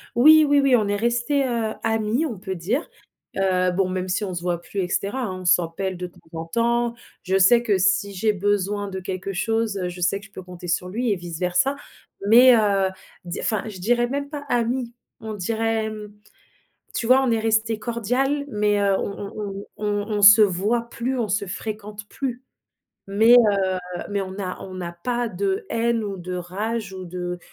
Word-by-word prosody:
Oui, 310 +6 +7
oui, 285 0 +4
oui, 270 -3 +5
on 210 -3 0
est 205 - 0
restés, 240 +6 +1
heu, 230 -3 -1
amis 225 +5 0
on 235 -10 -4
peut 190 0 -5
dire, 215 - -2 0.5
heu, 185 -1 +2
bon 185 0 +1
même 185 0 -3
si 185 +3 -1
on 190 - -3
se 175 - -4
voit 175 -1 -2
plus 200 - -6
et 180 - 0
cetera, 200 +8 -2
hein. 185 -4 -4
On - - -10
s'appelle 180 +1 +1
de 180 0 -4
temps 175 - -19 0.2
en 165 - -5
temps, 235 +5 0 0.3
je 190 0 +1
sais 235 +5 +6
que 210 -5 +1
si 195 +2 +1
j'ai 210 +3 +1
besoin 205 0 -1
de 190 -1 -5
quelque 190 +1 -4
chose, 225 +3 0
heu, 180 -2 -2
je 180 0 -9
sais 195 +3 0
que - - -13
je 200 - -18
peux 185 - -8
compter 180 -1 -9
sur 180 +2 0
lui 235 +6 -2
et 195 - 0
vice 170 -2 -7
versa. 180 +10 +1 0.5
Mais, 245 +3 +8
heu, 200 -3 +2 0.4
di 175 - -5
enfin 215 -3 -1
je 205 - -7
dirais 240 +5 +2
même 280 +2 -3
pas 290 -1 -6
amis, 240 -1 -1 0.3
on 220 -1 -6
dirait, 220 +2 -1
hem. 210 -1 -8 0.8
Tu 230 - -2
vois, 255 +1 +6
on 240 - +1
est 225 - +1
resté 220 0 +1
cordial 250 +5 -1
mais, 210 -3 +1
heu, 200 -1 +3
on 200 0 -5
on 200 -1 -5
on 215 - -6
on 205 0 -1
on - - -2
se 205 +2 +9
voit 210 +5 +1
plus, 250 +2 -3
on 230 - 0
se 200 0 -1
fréquente 210 +1 -6
plus. 255 0 -5 0.6
Mais, 220 +4 +4
heu, 210 -5 +6 0.5
mais 200 -1 -1
on 185 - -6
n'a 190 -1 -5
on 190 - -9
n'a 175 -2 -5
pas 245 -1 0
de 395 - -2
haine 230 0 0
ou 200 -2 -4
de 180 0 -6
rage 195 +4 -4
ou 185 -1 -7
de, 180 0 -5
210 Hz, 210 wpm, -23 LUFS, 190-235 Hz, 0.8 s, se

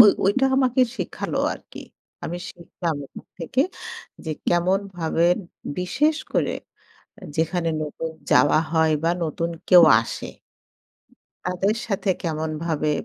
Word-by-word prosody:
ঐ - - +15 0.2
ঐটা 265 +8 +3
আমাকে 260 -1 +3 0.2
শিখালো - - -3
আরকি। - - -11 0.4
আমি 175 - -3
শিখলাম 170 -2 -4
ওখান - - -12
থেকে 175 +10 -1 0.6
যে, 160 - -3 0.2
কেমনভাবে 175 -2 +1 0.5
বিশেষ 295 - +1 0.2
করে - - +1 0.8
যেখানে 165 +1 0
নতুন 155 +2 -4 0.2
যাওয়া 145 - +5
হয় 160 -1 +3
বা 165 - +3
নতুন 165 +2 -2 0.2
কেউ 180 -1 +9 0.2
আসে। - - -6 1.2
তাদের 190 +4 +1
সাথে 195 -1 0
কেমনভাবে 155 -1 -1
170 Hz, 110 wpm, -23 LUFS, 160-195 Hz, 1.2 s, ঐ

